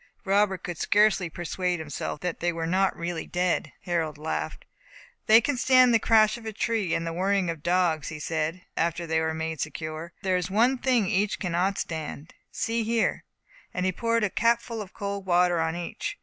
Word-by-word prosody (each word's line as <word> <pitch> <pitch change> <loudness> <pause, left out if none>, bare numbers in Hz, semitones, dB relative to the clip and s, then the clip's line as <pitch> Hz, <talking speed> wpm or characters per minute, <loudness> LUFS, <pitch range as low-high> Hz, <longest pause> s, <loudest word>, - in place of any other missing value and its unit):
Robert 195 -1 +2
could 175 -2 -5
scarcely 205 -4 +3
persuade 175 +1 -2
himself 150 -1 -5
that 180 -2 -3
they 175 0 +1
were 165 -1 -3
not 190 +3 +1
really 170 -1 -4
dead. 175 -4 0
Harold 165 -4 -1
laughed. 80 - -4 0.6
"They 220 +1 +8
can 285 0 -1
stand 255 -1 +5
the 230 - +5
crash 220 +1 +4
of 230 - -14
a - - -2
tree 215 -4 0
and 165 - -2
the 165 - -3
worrying 190 0 +1
of 160 -3 -8
dogs," 175 -3 +1
he 155 - -5
said, 160 +3 -2
after 170 +1 -1
they 160 -1 +1
were 160 0 -1
made 160 -1 -3
secure; 155 +2 -5
"but - - -17
there 185 -1 +3
is 180 +1 -3
one 240 +6 +3
thing 250 -4 +2
which 195 +2 0
they - - -27
cannot 185 +1 0
stand. 160 -1 -5 0.2
See 230 0 -1
here!" 230 0 0 0.5
and 180 - 0
he 185 - +2
poured 230 +3 0
a 205 - +1
cupful 230 0 +1
of 195 -3 -9
cold 200 -2 -5
water 175 -1 +3
on 160 0 -1
each. 175 -1 -5
180 Hz, 200 wpm, -26 LUFS, 165-210 Hz, 0.6 s, They